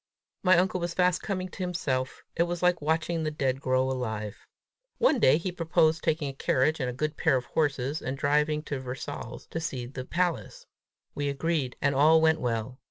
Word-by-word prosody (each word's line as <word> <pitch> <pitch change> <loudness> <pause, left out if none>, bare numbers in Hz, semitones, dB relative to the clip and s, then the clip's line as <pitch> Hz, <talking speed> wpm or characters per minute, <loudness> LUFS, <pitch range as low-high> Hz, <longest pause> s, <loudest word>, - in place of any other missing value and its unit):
My 185 -2 +5
uncle 185 +1 +2
was 170 -1 -3
fast 180 -2 +2
coming 185 -3 -3
to - - -13
himself! 140 -8 -2
It 170 +1 +2
was 175 0 -3
like 180 -2 +3
watching 160 +2 0
the 155 - 0
dead 135 -3 -1
grow 130 -1 +2
alive. 110 -5 -4 0.5
One 315 - +3
day 135 - +5
he 180 +2 -3
proposed 160 -2 +2
taking 155 -2 0
a 135 - -4
carriage 135 +3 +1
and 130 -2 -1
a - - -2
good 150 +4 -3
pair - - +3
of 125 -1 -1
horses, 145 -1 -1
and 130 +2 -4
driving 150 +2 +1
to 140 -3 -4
Versailles 130 +3 -6
to 165 - -2
see 130 -6 -4
the 130 +1 -6
palace. 175 +4 -2 0.5
We 145 0 -2
agreed, 140 -2 -1
and 140 -1 +3
all 155 +4 +6
went 160 0 +3
well. 120 +1 -2
150 Hz, 195 wpm, -28 LUFS, 130-170 Hz, 0.5 s, all